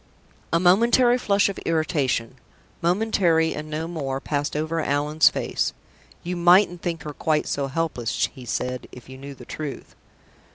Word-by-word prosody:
A 165 - +3
momentary 235 +7 +4
flush 200 -3 +2
of 200 - -4
irritation 145 -7 0 0.4
momentary, 175 -3 +2
and 155 0 -6
no 155 +2 -3
more 140 -6 -3
passed 145 +1 -2
over 155 +2 -1
Allan's 150 +1 +3
face. - - -2 0.5
"You 180 +1 -3
mightn't 175 0 +4
think 170 -2 -3
her 150 - -6
quite 155 +1 0
so 140 -1 -2
helpless," 135 -6 -1
he 130 - -11
said, 125 +2 -3
"if 125 0 -13
you 130 - -9
knew 140 0 -9
the 125 - -13
truth." 150 0 -7
155 Hz, 155 wpm, -24 LUFS, 140-175 Hz, 0.5 s, momentary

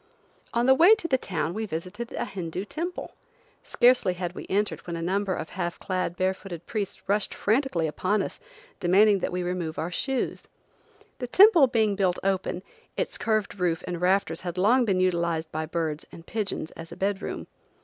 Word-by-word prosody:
On 235 +1 +1
the 265 - +7
way 345 +10 +7
to 425 -6 -4
the 260 -5 +2
town 165 -6 -2
we 220 +2 -3
visited 185 +8 -5
a - - -2
Hindoo 185 -1 -5
temple. 340 +10 -5 0.5
Scarcely 240 -7 +3
had 175 -1 -4
we - - -8
entered 205 0 -1
when 170 - -3
a - - -4
number 190 +1 0
of 160 - -5
half 175 -2 -3
clad, 185 -2 -2
bare 185 +1 +2
footed 175 -3 -9
priests 205 -3 -4
rushed 205 +1 0
frantically 220 - +1
upon 185 +6 0
us, - - -6 0.4
demanding 200 +3 +5
that - - -2
we 180 0 -2
remove 175 -3 -3
our 165 +2 -2
shoes. 265 +8 -2 0.7
The 250 - -3
temple 355 - +7
being 220 -4 +2
built 185 -3 +1
open, 190 -1 -1 0.3
its - - -2
curved 215 -3 0
roof 175 -1 0
and 175 -1 -4
rafters 180 -2 +1
had 180 -1 -5
long 235 +7 +4
been 190 -4 +1
utilized 170 -3 0
by 155 0 -3
birds 160 -2 -2
and 165 - -12
pigeons 200 -7 -3
as 165 0 -10
a - - -9
bed 195 +1 -1
room. - - -5
190 Hz, 190 wpm, -26 LUFS, 175-215 Hz, 0.7 s, the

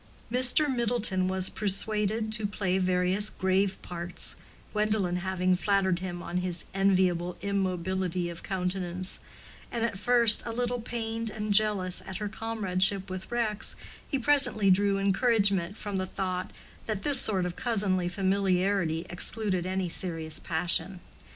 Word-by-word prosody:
Mr. 255 +4 +4
Middleton 235 -7 0
was 190 0 +1
persuaded 215 +1 +1
to 215 -1 0
play 190 -2 -1
various 185 +3 +2
grave 190 +1 0
parts, 175 0 -4 0.4
Gwendolen 210 -4 +1
having 185 0 0
flattered 190 -2 +1
him 175 -1 -6
on 175 +1 -4
his 180 -1 -2
enviable 185 -3 +1
immobility 185 -2 -2
of 170 -1 -8
countenance; 185 -1 -4 0.5
and 230 -1 -1
at 225 -5 -4
first 235 -1 +5
a 235 - -5
little 245 +1 -2
pained 225 -1 -4
and 210 -1 -3
jealous 200 -3 +2
at 190 - -5
her 210 - -4
comradeship 195 -3 -1
with 185 0 -7
Rex, 225 -3 -1 0.3
he 275 - 0
presently 260 -7 +5
drew 200 +1 +2
encouragement 200 -2 +2
from 205 -2 -4
the 185 0 -2
thought 185 -1 -3 0.4
that 210 -3 -3
this 280 -3 +7
sort 190 -4 +1
of 175 -1 -4
cousinly 200 -8 0
familiarity 190 -2 0
excluded 185 0 +1
any 190 0 -2
serious 165 -2 -3
passion. 175 +2 0
195 Hz, 140 wpm, -28 LUFS, 185-215 Hz, 0.5 s, this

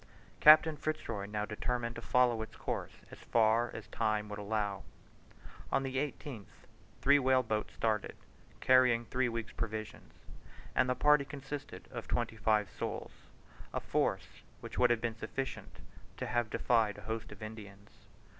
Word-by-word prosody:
Captain 155 +1 +8
Fitz 155 +1 -3
Roy 100 -3 -4
now 105 0 -2
determined 115 +2 -2
to 120 - -6
follow 120 -2 +3
its 110 - -7
course - - -4 0.2
as - - -11
far 115 +1 +3
as - - -8
time 105 -2 0
would 105 0 -5
allow. 105 -1 -2 0.9
On 135 - +2
the 135 0 -3
18th 135 -6 -4 0.5
three 140 +1 +6
whale 130 -1 +3
boats 110 -2 -2
started, 110 -3 -1 0.5
carrying 125 -2 +5
three 125 +1 0
weeks' 115 -1 -4
provisions; 110 -1 -5 0.6
and 125 - +2
the 125 - +2
party 150 0 +5
consisted 140 0 -7
of 120 -3 -6
twenty 120 -2 -1
five 110 -1 +2
souls - - -5 0.6
a - - +1
force - - -1 0.2
which - - -7
would 125 - +5
have 120 -2 +2
been 115 -1 -3
sufficient 135 +5 -5 0.4
to - - -3
have 120 -1 0
defied 110 -3 +2
a - - -10
host 110 +1 -5
of 105 0 -10
Indians. 105 -2 -10
115 Hz, 155 wpm, -33 LUFS, 110-130 Hz, 0.9 s, Captain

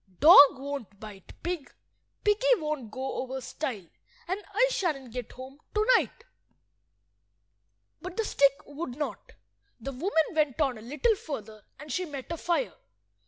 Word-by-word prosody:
Dog 285 -3 +9
won't 265 -7 -6
bite 210 -3 -11
pig, 345 -5 -3 0.5
piggy - - +4
won't 305 - -4
go 260 +4 -4
over 265 +1 -4
stile, 250 - -5 0.4
and 380 +4 -3
I 470 +5 +4
shan't 285 - -2
get 250 -2 -6
home 260 +3 -11 0.2
to–night." 465 +2 +2 1.8
But 365 0 -7
the 450 - +1
stick 280 -6 +2
would 285 -3 -6
not. 300 - -5 0.5
The 275 - -5
woman 320 +4 +1
went 305 -5 0
on 265 -7 +1
a - - -12
little 295 - +1
further, 220 - -7 0.2
and 295 +1 -9
she 365 +8 -1
met 285 -2 -7
a 335 - -2
fire. 345 +9 0
290 Hz, 145 wpm, -28 LUFS, 260-355 Hz, 1.8 s, Dog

